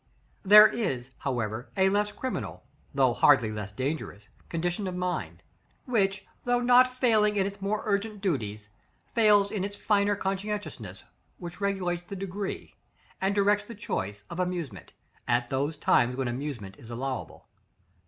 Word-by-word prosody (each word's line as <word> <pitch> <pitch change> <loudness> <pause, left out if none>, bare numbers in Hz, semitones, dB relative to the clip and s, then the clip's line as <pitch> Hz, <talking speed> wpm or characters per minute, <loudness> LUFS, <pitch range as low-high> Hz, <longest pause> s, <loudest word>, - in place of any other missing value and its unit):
§ - - -44 0.4
XXIX. - - -7
There 210 +1 +11
is, 135 - -3
however, 120 -2 -3
a 190 0 +4
less 205 +1 +1
criminal, 260 +3 -5 0.3
though 130 -3 +3
hardly 120 -6 +4
less 105 -1 -5
dangerous 130 -4 -4 0.2
condition 175 +4 -2
of 185 - -4
mind; 180 0 -3 0.4
which, 195 -5 0 0.2
though 245 0 +2
not 250 +1 +5
failing 220 -5 +3
in 195 -2 +2
its 200 0 -6
more 205 +2 -1
urgent 210 0 -1
duties, 110 - -2 0.4
fails 205 -3 +4
in 210 -3 -2
the 200 - -1
finer 205 0 +1
conscientiousness 205 +2 -4 0.3
which 175 +2 -9
regulates 185 -3 -1
the 175 +3 -8
degree, 195 +1 -5 0.5
and 195 +1 +1
directs 205 +1 +3
the 230 - -9
choice, 105 - -4
of 170 - -7
amusement, 175 - -3 0.4
at 120 0 +1
those 140 +3 -1
times 125 -3 +3
when 130 -1 -2
amusement 120 -6 -5
is 115 - -13
allowable. 130 +3 -5
190 Hz, 155 wpm, -28 LUFS, 130-205 Hz, 0.5 s, There